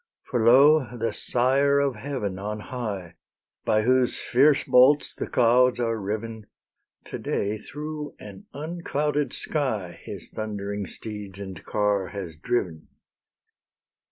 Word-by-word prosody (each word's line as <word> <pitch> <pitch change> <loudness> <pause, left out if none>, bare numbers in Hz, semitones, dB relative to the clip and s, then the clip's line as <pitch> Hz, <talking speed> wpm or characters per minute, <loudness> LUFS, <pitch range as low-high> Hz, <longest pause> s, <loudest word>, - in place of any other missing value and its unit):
For 120 -4 -1
lo! 130 +1 +5
the 115 0 -1
Sire 135 +3 +2
of 140 -2 +1
heaven 105 -5 -4
on 105 +2 -4
high, 105 -8 -5 0.5
By 110 0 +2
whose 130 +1 +3
fierce 140 +3 +3
bolts 135 +4 +5
the - - -5
clouds 125 +1 +4
are 115 -2 -1
riven, 110 +2 -4 0.6
To - - -6
day 105 +2 -2
through 150 +4 -7
an 100 -2 -11
unclouded 150 -1 -2
sky 110 - -2
His - - -7
thundering 100 -2 -4
steeds 105 -3 -7
and 95 -2 -8
car 105 -2 0
has 90 -6 -7
driven. 80 -2 -2
115 Hz, 125 wpm, -25 LUFS, 105-135 Hz, 0.6 s, lo